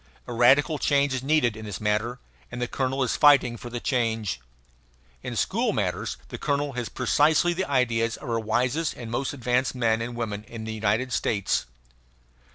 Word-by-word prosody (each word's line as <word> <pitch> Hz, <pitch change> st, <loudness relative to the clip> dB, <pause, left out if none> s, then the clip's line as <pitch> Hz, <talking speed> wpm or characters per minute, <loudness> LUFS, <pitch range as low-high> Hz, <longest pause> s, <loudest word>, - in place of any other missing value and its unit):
A 120 Hz, -, -6 dB
radical 140 Hz, +6 st, +4 dB
change 140 Hz, -1 st, +2 dB
is 130 Hz, -, -2 dB
needed 135 Hz, -5 st, +2 dB
in 110 Hz, 0 st, -8 dB
this 105 Hz, -4 st, -5 dB
matter; 110 Hz, +3 st, 0 dB, 0.3 s
and 125 Hz, -, -6 dB
the 125 Hz, -, -1 dB
colonel 135 Hz, +1 st, -1 dB
is 125 Hz, -, 0 dB
fighting 140 Hz, -5 st, +5 dB
for 120 Hz, +1 st, -8 dB
the 120 Hz, 0 st, -4 dB
change. 115 Hz, -, -1 dB, 0.8 s
In -, -, -5 dB
school -, -, 0 dB
matters -, -, -2 dB
the -, -, -7 dB
colonel 145 Hz, 0 st, -1 dB
has 125 Hz, -2 st, -4 dB
precisely 150 Hz, +7 st, +3 dB
the 190 Hz, -1 st, -3 dB
ideas 115 Hz, -4 st, +1 dB
of -, -, -10 dB
our 115 Hz, -1 st, 0 dB
wisest 125 Hz, +8 st, 0 dB
and 115 Hz, -2 st, -8 dB
most 130 Hz, +3 st, -1 dB
advanced 125 Hz, -1 st, 0 dB
men 115 Hz, -2 st, +1 dB
and 120 Hz, +1 st, -4 dB
women 105 Hz, -3 st, -4 dB
in 115 Hz, 0 st, -8 dB
the 110 Hz, 0 st, -4 dB
United 110 Hz, +4 st, 0 dB
States. 100 Hz, -, 0 dB
120 Hz, 180 wpm, -26 LUFS, 115-135 Hz, 0.8 s, fighting